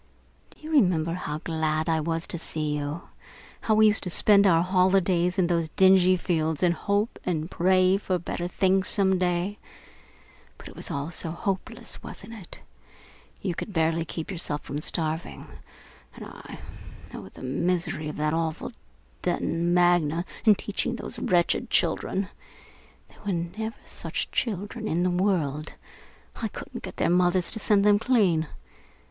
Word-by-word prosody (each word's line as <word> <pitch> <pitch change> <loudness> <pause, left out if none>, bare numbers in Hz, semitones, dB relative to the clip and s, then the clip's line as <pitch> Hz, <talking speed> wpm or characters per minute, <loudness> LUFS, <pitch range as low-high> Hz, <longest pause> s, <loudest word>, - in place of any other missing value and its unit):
"Do - - -21
you 310 +1 -7
remember 180 - +3
how 150 -4 -4
glad 160 -1 -1
I 160 -1 +2
was 165 +1 -1
to 170 - -5
see 155 -2 -1
you? 145 +3 -4 0.6
How 220 - +2
we 220 0 +6
used 215 0 +5
to 185 - -3
spend 200 +3 +5
our 165 -2 +4
holidays 185 -1 +2
out - - -2
in - - +3
those 170 -2 0
dingy 185 +1 +5
fields 160 -3 -1
and 175 -1 +4
hope 205 +5 -1
and 165 -1 -2
pray 185 +1 +3
for 190 -2 -1
better 175 0 -4
things 190 +1 +1
some 190 -2 +2
day? 180 +3 -1 1.0
But - - -12
it - - -14
was - - -7
all 140 +3 -3
so 165 - -4
hopeless, 185 +3 -3
wasn't 230 - -9
it! 200 -6 -9 0.8
You 185 - -1
could 205 - -6
barely 165 0 +1
keep 165 +2 -6
yourself 150 -5 -3
from 145 +1 -5
starving, 160 +1 -2 0.7
and - - -9
I - - -10 0.6
oh, 95 - -8
the - - -13
misery 160 +3 -1
of - - -7
that 150 0 0
awful 165 +5 -2 0.5
Detton 170 -1 -1
Magna 175 -2 +3 0.2
and 210 -2 +7
teaching 235 +4 -2
those - - -7
wretched 175 -1 +1
children! 195 0 0 1.0
There 205 - -1
never 170 +6 -4
were - - -25
such - - -5
children 215 0 -2
in 175 0 0
the 180 - +2
world. 170 -6 0 0.6
I - - -2
couldn't - - -8
get - - -8
their - - +1
mothers 180 0 +3
to 220 - +1
send 205 -1 +3
them 205 -1 +5
clean. 200 -10 +2
175 Hz, 160 wpm, -26 LUFS, 160-195 Hz, 1.0 s, and